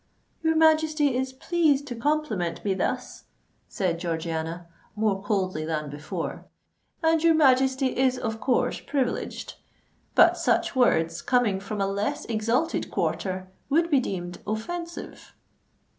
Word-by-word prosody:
"Your 320 Hz, 0 st, +2 dB
Majesty 310 Hz, -3 st, +3 dB
is 260 Hz, +1 st, -1 dB
pleased 290 Hz, 0 st, +1 dB
to 250 Hz, -4 st, -5 dB
compliment 230 Hz, -, -1 dB
me 200 Hz, -, +2 dB
thus," 190 Hz, -, -3 dB, 0.4 s
said 175 Hz, -4 st, -1 dB
Georgiana, 165 Hz, 0 st, -3 dB, 0.3 s
more 210 Hz, -3 st, 0 dB
coldly 190 Hz, -6 st, -1 dB
than 155 Hz, -2 st, -3 dB
before: 150 Hz, +2 st, -5 dB, 0.6 s
"and 320 Hz, 0 st, +3 dB
your 330 Hz, -1 st, +5 dB
Majesty 265 Hz, -2 st, +3 dB
is 260 Hz, -1 st, +2 dB
of 220 Hz, -2 st, -3 dB
course 250 Hz, 0 st, +1 dB
privileged. 270 Hz, -4 st, -3 dB, 0.6 s
But -, -, +6 dB
such -, -, +1 dB
words, 165 Hz, -10 st, +2 dB
coming 245 Hz, -6 st, +2 dB
from 200 Hz, +2 st, -5 dB
a 195 Hz, -, +2 dB
less 200 Hz, +1 st, -2 dB
exalted 230 Hz, +8 st, 0 dB
quarter, 185 Hz, -1 st, -2 dB, 0.2 s
would 330 Hz, +4 st, +2 dB
be 280 Hz, -, +5 dB
deemed 175 Hz, -7 st, -4 dB
offensive." 340 Hz, +11 st, -5 dB
235 Hz, 130 wpm, -26 LUFS, 185-285 Hz, 0.6 s, But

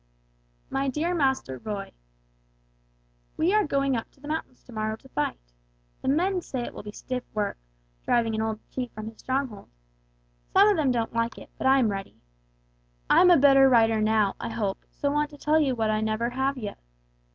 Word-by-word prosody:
"MY 270 Hz, +1 st, 0 dB
DEAR 315 Hz, +6 st, -1 dB
MASTER 265 Hz, -, 0 dB
ROY: 200 Hz, -, -5 dB, 1.5 s
"We 350 Hz, +5 st, +2 dB
are 425 Hz, 0 st, +4 dB
going 275 Hz, -2 st, +1 dB
up 225 Hz, -, -4 dB
to -, -, -29 dB
the 290 Hz, -, -11 dB
mountains 305 Hz, -4 st, -4 dB
to -, -, -15 dB
morrow 215 Hz, 0 st, -2 dB
to 265 Hz, +4 st, -19 dB
fight. 150 Hz, -, -2 dB, 0.6 s
The -, -, -6 dB
men 360 Hz, +7 st, +2 dB
say 260 Hz, -6 st, -4 dB
it -, -, -6 dB
will -, -, -7 dB
be 210 Hz, -, -8 dB
stiff 250 Hz, +3 st, -5 dB
work, 205 Hz, -, -1 dB, 0.4 s
driving 230 Hz, -2 st, +2 dB
an 220 Hz, -, -1 dB
old 220 Hz, -1 st, -2 dB
chief 250 Hz, -2 st, -4 dB
from 215 Hz, 0 st, -7 dB
his 225 Hz, -, -17 dB
stronghold. 260 Hz, -5 st, -3 dB, 0.8 s
Some 395 Hz, +2 st, +7 dB
of 415 Hz, -, +4 dB
them 300 Hz, -6 st, +2 dB
don't 235 Hz, -2 st, 0 dB
like 230 Hz, 0 st, -1 dB
it, -, -, -12 dB
but -, -, -1 dB
I 265 Hz, +1 st, +6 dB
am 245 Hz, -5 st, +3 dB
ready. 195 Hz, -1 st, -6 dB, 0.9 s
I -, -, +7 dB
am 365 Hz, -, +7 dB
a 350 Hz, -, +7 dB
better 270 Hz, -1 st, +6 dB
writer 225 Hz, -3 st, +4 dB
now, 215 Hz, -2 st, +2 dB
I -, -, -4 dB
hope, 210 Hz, -4 st, -3 dB
so 285 Hz, -, -2 dB
want 295 Hz, 0 st, +1 dB
to 295 Hz, -, -13 dB
tell 305 Hz, +2 st, +2 dB
you 275 Hz, -4 st, +2 dB
what 220 Hz, -2 st, +1 dB
I 215 Hz, 0 st, 0 dB
never 220 Hz, +2 st, -1 dB
have 265 Hz, +2 st, -1 dB
yet. 210 Hz, -5 st, -6 dB
250 Hz, 200 wpm, -26 LUFS, 220-280 Hz, 1.5 s, Some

